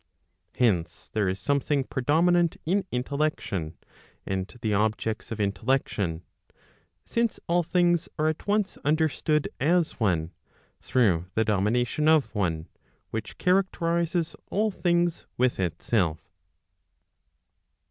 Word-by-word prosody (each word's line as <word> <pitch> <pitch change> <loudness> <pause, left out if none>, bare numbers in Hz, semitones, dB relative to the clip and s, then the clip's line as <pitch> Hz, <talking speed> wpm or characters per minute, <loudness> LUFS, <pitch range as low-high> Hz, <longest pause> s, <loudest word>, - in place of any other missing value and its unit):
Hence 90 -9 0
there 105 -3 +1
is 95 +1 -3
something 140 +5 +1
predominant 165 +7 +2
in 190 +4 +1
intellection, 125 - -2 0.5
and 95 0 -3
the 110 -2 +1
objects 110 +1 -1
of 110 - -4
intellection; 100 -5 0 0.8
since 235 -2 0
all 175 +1 +3
things 175 -1 +2
are 155 0 +2
at 155 +4 -2
once 205 -1 +1
understood 150 0 +1
as 170 +3 +1
one, 85 -7 +1 0.5
through 95 -9 +2
the 110 - +2
domination 115 +8 +1
of 155 -3 +4
one, 85 -6 -1 0.4
which 110 -1 -5
characterizes 170 -3 +1
all 215 +1 +1
things 175 -2 0
with 125 -3 +1
itself. 90 -1 -1
130 Hz, 105 wpm, -27 LUFS, 100-170 Hz, 0.8 s, of